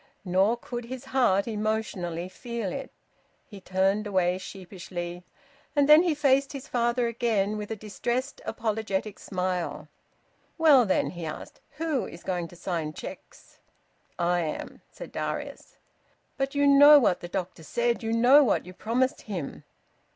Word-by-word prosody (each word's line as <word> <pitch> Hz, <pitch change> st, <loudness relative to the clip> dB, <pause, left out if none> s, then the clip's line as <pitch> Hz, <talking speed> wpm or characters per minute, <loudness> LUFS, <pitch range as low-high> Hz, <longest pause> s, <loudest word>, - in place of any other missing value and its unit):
Nor 190 Hz, +6 st, +2 dB
could 240 Hz, 0 st, -6 dB
his 255 Hz, +2 st, -7 dB
heart 240 Hz, -7 st, +2 dB
emotionally 210 Hz, -6 st, -2 dB
feel 230 Hz, +1 st, -5 dB
it. -, -, -6 dB, 0.5 s
He 200 Hz, -2 st, -12 dB
turned 195 Hz, +3 st, +1 dB
away 185 Hz, -2 st, +1 dB
sheepishly, 180 Hz, -2 st, -7 dB, 0.5 s
and 285 Hz, -1 st, +4 dB
then 300 Hz, +2 st, +9 dB
he 345 Hz, -4 st, +1 dB
faced 275 Hz, -1 st, +2 dB
his 275 Hz, +1 st, -7 dB
father 240 Hz, 0 st, +1 dB
again, 225 Hz, -3 st, 0 dB
with 210 Hz, -1 st, -5 dB
a 220 Hz, -, -3 dB
distressed, 240 Hz, +6 st, -3 dB
apologetic 215 Hz, -2 st, -2 dB
smile. 180 Hz, -2 st, -3 dB, 0.7 s
"Well 290 Hz, -8 st, +6 dB
then," 190 Hz, -, +1 dB
he 175 Hz, -1 st, -8 dB
asked, 155 Hz, -, -7 dB, 0.2 s
"who 310 Hz, -5 st, -1 dB
is 170 Hz, -, -11 dB
going 175 Hz, -2 st, -2 dB
to 175 Hz, -, -15 dB
sign 165 Hz, -4 st, -3 dB
cheques?" -, -, -11 dB, 0.6 s
"I 175 Hz, +1 st, +1 dB
am," 160 Hz, -3 st, -5 dB
said -, -, -10 dB
Darius. -, -, -5 dB, 0.6 s
"But 270 Hz, 0 st, -2 dB
you 285 Hz, 0 st, +3 dB
know 285 Hz, +1 st, +9 dB
what 220 Hz, -10 st, +3 dB
the 175 Hz, -, -7 dB
doctor 180 Hz, -1 st, -4 dB
said! 235 Hz, +8 st, 0 dB
You 225 Hz, -1 st, -2 dB
know 250 Hz, +6 st, +6 dB
what 260 Hz, -, +1 dB
you 180 Hz, -, -10 dB
promised 240 Hz, +7 st, 0 dB
him!" 175 Hz, -9 st, -5 dB
215 Hz, 150 wpm, -27 LUFS, 185-255 Hz, 0.7 s, then